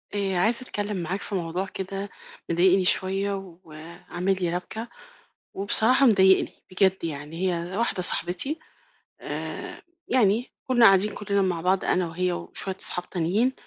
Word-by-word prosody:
آآ 195 Hz, -2 st, -1 dB
عايزة 225 Hz, +7 st, +2 dB
أتكلم 205 Hz, -4 st, -3 dB
معاك 180 Hz, +3 st, -3 dB
في 200 Hz, -, -4 dB
موضوع 180 Hz, +1 st, -2 dB
كده 195 Hz, +1 st, -6 dB, 0.4 s
مضايقني 185 Hz, +2 st, +3 dB
شويّة 195 Hz, -1 st, 0 dB
وعامل 170 Hz, +4 st, -4 dB
لي 175 Hz, -1 st, -1 dB
ربكة، 220 Hz, +6 st, -6 dB, 0.7 s
وبصراحة 225 Hz, +7 st, +3 dB
مضايقني 190 Hz, -4 st, +4 dB, 0.2 s
بجد 190 Hz, -1 st, +1 dB
يعني. 150 Hz, 0 st, -6 dB, 0.2 s
هي 175 Hz, +3 st, -4 dB
واحدة 230 Hz, -5 st, 0 dB
صاحبتي 180 Hz, -, +2 dB, 0.6 s
آآ -, -, -6 dB, 0.3 s
يعني 235 Hz, -1 st, +2 dB, 0.2 s
كنا 245 Hz, -2 st, +4 dB
قاعدين 195 Hz, +1 st, +5 dB
كلّنا 200 Hz, -1 st, -1 dB
مع 180 Hz, -3 st, -1 dB
بعض 185 Hz, +2 st, +1 dB
أنا 180 Hz, -1 st, +1 dB
وهي 180 Hz, +2 st, -1 dB
وشويّة 190 Hz, +2 st, -3 dB
أصحاب 180 Hz, -, 0 dB
تانيين، 195 Hz, +9 st, 0 dB
190 Hz, 135 wpm, -25 LUFS, 175-205 Hz, 0.7 s, قاعدين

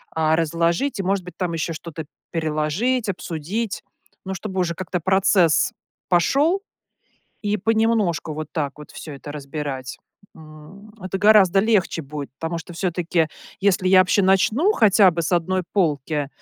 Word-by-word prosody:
а, 160 Hz, 0 st, +2 dB
разложить. 170 Hz, -, 0 dB
И, -, -, -1 dB
может 195 Hz, 0 st, 0 dB
быть, 180 Hz, -, -10 dB
там 180 Hz, -3 st, -2 dB
еще 165 Hz, 0 st, -2 dB
что-то 160 Hz, -1 st, -7 dB, 0.3 s
переложить, 165 Hz, +10 st, -1 dB
обсудить, 190 Hz, +4 st, -4 dB, 0.4 s
но 190 Hz, -, -3 dB
чтобы 190 Hz, -1 st, -5 dB
уже 170 Hz, -2 st, 0 dB
как-то 185 Hz, 0 st, -3 dB
процесс 190 Hz, -2 st, +3 dB, 0.4 s
пошел, 285 Hz, -, +2 dB, 0.8 s
и 205 Hz, 0 st, 0 dB
понемножку, 220 Hz, -7 st, +1 dB
вот 155 Hz, 0 st, -5 dB
так 145 Hz, -4 st, -2 dB
вот, 150 Hz, -, -12 dB
всё 155 Hz, -, -9 dB
это 140 Hz, +1 st, -9 dB
разбирать. 140 Hz, -2 st, -5 dB, 0.4 s
М. 160 Hz, +7 st, -14 dB
Это 185 Hz, +1 st, -3 dB
гораздо 200 Hz, -2 st, +5 dB
легче 210 Hz, -6 st, +1 dB
будет, 145 Hz, -1 st, -7 dB
потому 165 Hz, +1 st, -3 dB
что 165 Hz, +1 st, -9 dB
всё-таки 170 Hz, -1 st, 0 dB, 0.3 s
если 190 Hz, -2 st, +2 dB
я 185 Hz, 0 st, +6 dB
вообще 185 Hz, +2 st, +3 dB
начну, 215 Hz, -, +3 dB
хотя 210 Hz, -, +5 dB
бы 170 Hz, 0 st, -2 dB
с 165 Hz, -, -3 dB
1 185 Hz, +2 st, +1 dB
полки, 150 Hz, -5 st, 0 dB
175 Hz, 150 wpm, -22 LUFS, 155-200 Hz, 0.8 s, я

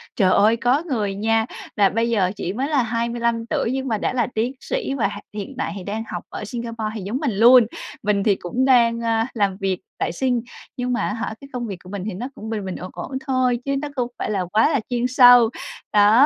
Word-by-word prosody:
Trời 185 Hz, -4 st, +3 dB
ơi, 220 Hz, +3 st, +4 dB
có 255 Hz, +7 st, +2 dB
người 210 Hz, -8 st, -1 dB
nha, 225 Hz, +2 st, +1 dB, 0.3 s
và 200 Hz, -2 st, +5 dB
bây 230 Hz, +2 st, 0 dB
giờ 190 Hz, -5 st, +2 dB
chỉ 185 Hz, -1 st, -3 dB
mới 265 Hz, +5 st, -1 dB
là 285 Hz, -5 st, +2 dB
25 235 Hz, 0 st, -1 dB
tuổi 230 Hz, -, -1 dB
nhưng 265 Hz, 0 st, -2 dB
mà 220 Hz, -, 0 dB
đã 210 Hz, -, -1 dB
là 240 Hz, -2 st, +1 dB
tiến 230 Hz, +4 st, 0 dB
sĩ -, -, -3 dB
và 260 Hz, -, +1 dB
ha 205 Hz, -, -7 dB
hiện 210 Hz, +6 st, -6 dB
tại -, -, -2 dB
thì 185 Hz, -, -7 dB
đang 215 Hz, +4 st, -3 dB
học -, -, -5 dB
ở 210 Hz, -, -6 dB
Singapore 230 Hz, -1 st, -4 dB
thì 215 Hz, -, -4 dB
giống 205 Hz, +7 st, -3 dB
mình 280 Hz, -5 st, -1 dB
luôn, 240 Hz, +1 st, +8 dB, 0.4 s
mình 205 Hz, -1 st, +1 dB
thì 205 Hz, -2 st, +3 dB
cũng 240 Hz, +9 st, -1 dB
đang, 235 Hz, -3 st, +4 dB
ơ, 225 Hz, -1 st, +1 dB
làm 200 Hz, -4 st, 0 dB
việc 190 Hz, -2 st, -1 dB, 0.2 s
tại -, -, -1 dB
Sing, 245 Hz, +4 st, 0 dB, 0.4 s
nhưng 250 Hz, 0 st, -1 dB
mà 240 Hz, -, 0 dB
á -, -, -1 dB
hả 225 Hz, -1 st, -3 dB
cái 275 Hz, -, -10 dB
công 240 Hz, -2 st, -3 dB
việc 195 Hz, -3 st, -5 dB
của 180 Hz, -, -12 dB
mình 200 Hz, -2 st, -5 dB
thì 215 Hz, -, -3 dB
nó 235 Hz, +8 st, -4 dB
cũng 220 Hz, +1 st, -8 dB
bình 210 Hz, -3 st, -3 dB
bình, 185 Hz, -, -4 dB
ổn 185 Hz, -, -7 dB
ổn -, -, -7 dB, 0.2 s
thôi 255 Hz, -2 st, +2 dB
chứ 275 Hz, -, 0 dB
nó 295 Hz, -, -3 dB
không 245 Hz, -2 st, 0 dB
phải -, -, -2 dB
là 190 Hz, -3 st, -1 dB
quá 215 Hz, -, +3 dB
là 285 Hz, -4 st, +2 dB
chuyên 245 Hz, 0 st, 0 dB
sâu. 245 Hz, -2 st, +7 dB, 0.4 s
Đó, 210 Hz, +6 st, +6 dB
230 Hz, 250 wpm, -22 LUFS, 205-250 Hz, 0.4 s, luôn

